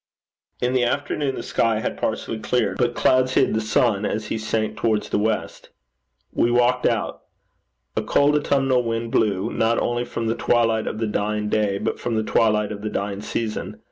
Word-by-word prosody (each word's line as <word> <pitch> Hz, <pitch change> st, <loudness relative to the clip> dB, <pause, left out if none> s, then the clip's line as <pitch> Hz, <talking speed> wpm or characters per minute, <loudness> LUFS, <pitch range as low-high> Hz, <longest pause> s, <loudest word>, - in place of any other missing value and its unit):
In 125 Hz, +1 st, +1 dB
the 130 Hz, -1 st, +2 dB
afternoon 140 Hz, +2 st, -1 dB
the -, -, -5 dB
sky 115 Hz, -2 st, +1 dB
had -, -, -3 dB
partially 110 Hz, -, -3 dB
cleared, 125 Hz, +3 st, 0 dB
but 120 Hz, -1 st, +1 dB
clouds 130 Hz, 0 st, +3 dB
hid 135 Hz, -, +3 dB
the 110 Hz, -, +1 dB
sun 110 Hz, -1 st, +1 dB
as 110 Hz, 0 st, -2 dB
he -, -, -1 dB
sank 110 Hz, 0 st, -1 dB
towards 110 Hz, -2 st, 0 dB
the -, -, +1 dB
west. 110 Hz, +2 st, -2 dB, 0.6 s
We 120 Hz, -, +2 dB
walked 125 Hz, +1 st, +3 dB
out. -, -, -1 dB, 0.7 s
A -, -, +1 dB
cold 145 Hz, +1 st, +3 dB
autumnal 135 Hz, -3 st, +2 dB
wind 115 Hz, -1 st, -3 dB
blew, 105 Hz, -1 st, +1 dB
not 115 Hz, +1 st, +2 dB
only 120 Hz, 0 st, 0 dB
from 115 Hz, -, -4 dB
the 115 Hz, -, +1 dB
twilight 115 Hz, -2 st, +1 dB
of -, -, -3 dB
the 115 Hz, -, -1 dB
dying 105 Hz, 0 st, -1 dB
day, 105 Hz, -2 st, +1 dB
but -, -, -2 dB
from 120 Hz, -2 st, -2 dB
the 110 Hz, -, +1 dB
twilight 105 Hz, -1 st, +2 dB
of 100 Hz, -1 st, -6 dB
the 105 Hz, -, -3 dB
dying 100 Hz, 0 st, -3 dB
season. 110 Hz, 0 st, -4 dB
115 Hz, 190 wpm, -23 LUFS, 105-120 Hz, 0.7 s, clouds